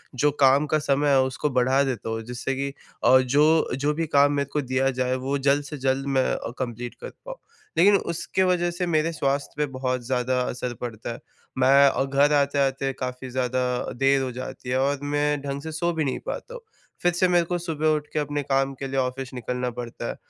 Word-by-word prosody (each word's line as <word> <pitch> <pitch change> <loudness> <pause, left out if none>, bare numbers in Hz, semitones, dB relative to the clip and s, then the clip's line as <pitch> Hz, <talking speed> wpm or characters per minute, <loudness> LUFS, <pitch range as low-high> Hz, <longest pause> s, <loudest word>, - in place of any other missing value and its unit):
जो 145 +4 +2
काम 140 0 +4
का 155 +2 +1
समय 145 0 +1
है, 135 -1 +5
उसको 130 +3 -1
बढ़ा 130 +1 +2
देता 125 -5 -3
हूँ 115 0 -3
जिससे 125 +3 -4
कि 140 +1 -3 0.3
अ, 130 - +7
जो 150 +5 +3
जो 145 +3 0
भी 165 +1 -2
काम 145 -1 +4
मेरे 140 -1 -1
को 150 - +1
दिया 130 0 0
जाए 130 0 +1
वो 135 +2 -2
जल्द 140 +1 +2
से 150 +1 -7
जल्द 135 0 0
मैं 130 - +4
अ, - - -4
कंप्लीट 120 -1 -4
कर - - -6 0.2
पाऊँ। - - -7 0.4
लेकिन 200 +5 +6
उसके 170 +2 -2
वजह 175 -1 +1
से 180 +1 -2
मेरे 160 0 +1
स्वास्थ्य 140 -3 -1
पे 150 - +1
बहुत 130 -1 -1
ज़्यादा 125 0 0
असर 125 0 -3
पड़ता 115 -1 -5
है। - - -10 0.4
मैं 135 +2 +6
और 135 0 -1
घर 140 +2 +3
आते-आते 140 -1 +1
काफ़ी 130 0 -5
ज़्यादा 130 0 -1 0.3
देर 135 +1 +3
हो 130 -1 -2
जाती 130 0 -7
है 130 - +1
और 140 +1 +1
मैं 145 0 0
ढंग 140 0 -4
से 160 +2 -6
सो 170 +2 -1
भी 160 -1 0
नहीं 135 - -2
पाता - - -5
हूँ। - - -8 0.4
फिर 175 - +3
से 180 +2 +2
मेरे 175 -1 +3
को 175 +1 -1
सुबह 160 -3 -2
उठ 150 -1 -4
के 155 - 0
अपने 145 0 -2
काम 135 0 +1
के 135 - -3
लिए 135 0 -1
ऑफ़िस 130 0 -3
निकलना 125 0 -3
पड़ता 120 -1 -5
है - - -4
135 Hz, 220 wpm, -25 LUFS, 130-150 Hz, 0.4 s, अ